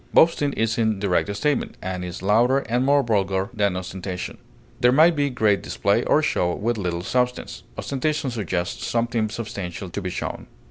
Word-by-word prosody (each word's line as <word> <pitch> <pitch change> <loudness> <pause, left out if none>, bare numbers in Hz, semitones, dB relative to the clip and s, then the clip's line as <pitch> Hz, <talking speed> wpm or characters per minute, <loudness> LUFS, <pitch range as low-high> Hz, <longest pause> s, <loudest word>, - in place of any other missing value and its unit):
Boasting 155 -3 +5
is 115 +1 0
in 110 -2 +2
direct 100 0 +1
statement, 145 +6 -1
and 90 0 -4
is 90 0 -6
louder 120 +7 +3
and 125 +2 +1
more 140 +1 +4
vulgar 100 -3 0
than 100 -4 +1
ostentation. 90 0 -5 0.4
There 125 - +5
may 155 +6 +6
be 145 -3 0
great 110 -6 +2
display - - +1
or - - +3
show 90 0 +1
with 115 +1 -1
little 85 -2 -2
substance; 125 +4 -1 0.2
ostentation 140 0 -1
suggests 95 -6 -3
something 115 -2 0
substantial 100 -5 -6
to 100 - -4
be 90 - -3
shown. - - -5
110 Hz, 170 wpm, -23 LUFS, 95-125 Hz, 0.4 s, may